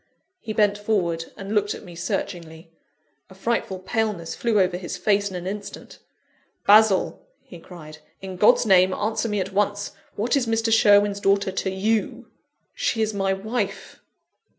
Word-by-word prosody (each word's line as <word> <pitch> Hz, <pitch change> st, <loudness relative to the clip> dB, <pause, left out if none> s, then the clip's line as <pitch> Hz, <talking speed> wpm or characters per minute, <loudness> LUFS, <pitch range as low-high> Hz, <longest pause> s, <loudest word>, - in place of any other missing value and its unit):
He 220 Hz, -, -7 dB
bent 210 Hz, -1 st, +2 dB
forward, 175 Hz, -6 st, -1 dB
and 195 Hz, +2 st, -6 dB
looked 205 Hz, -1 st, +1 dB
at -, -, -11 dB
me 180 Hz, -3 st, -11 dB
searchingly. 165 Hz, -1 st, -5 dB, 0.6 s
A 190 Hz, -, -15 dB
frightful 195 Hz, -1 st, -2 dB
paleness 195 Hz, -3 st, -2 dB
flew 230 Hz, -3 st, 0 dB
over 185 Hz, -1 st, +2 dB
his 180 Hz, +1 st, -5 dB
face 200 Hz, +2 st, +1 dB
in 190 Hz, -, -8 dB
an 180 Hz, 0 st, -6 dB
instant. 200 Hz, +2 st, -7 dB, 0.7 s
"Basil!" 210 Hz, -2 st, +4 dB, 0.2 s
he 175 Hz, -, -13 dB
cried, 155 Hz, -3 st, -12 dB, 0.2 s
"in 190 Hz, -1 st, -7 dB
God's 210 Hz, +5 st, +4 dB
name, 185 Hz, -2 st, +4 dB
answer 220 Hz, +2 st, -2 dB
me 210 Hz, -1 st, -1 dB
at 190 Hz, +1 st, -4 dB
once! 205 Hz, 0 st, -1 dB, 0.2 s
What 235 Hz, +6 st, 0 dB
is 265 Hz, -4 st, 0 dB
Mr. 225 Hz, 0 st, +1 dB
Sherwin's 205 Hz, -2 st, +4 dB
daughter 200 Hz, 0 st, +1 dB
to 190 Hz, 0 st, -2 dB
you?" 210 Hz, +3 st, -2 dB, 0.4 s
"She 225 Hz, -2 st, 0 dB
is 215 Hz, 0 st, -2 dB
my 195 Hz, -1 st, 0 dB
wife!" 200 Hz, -1 st, -4 dB
200 Hz, 160 wpm, -23 LUFS, 185-215 Hz, 0.7 s, Basil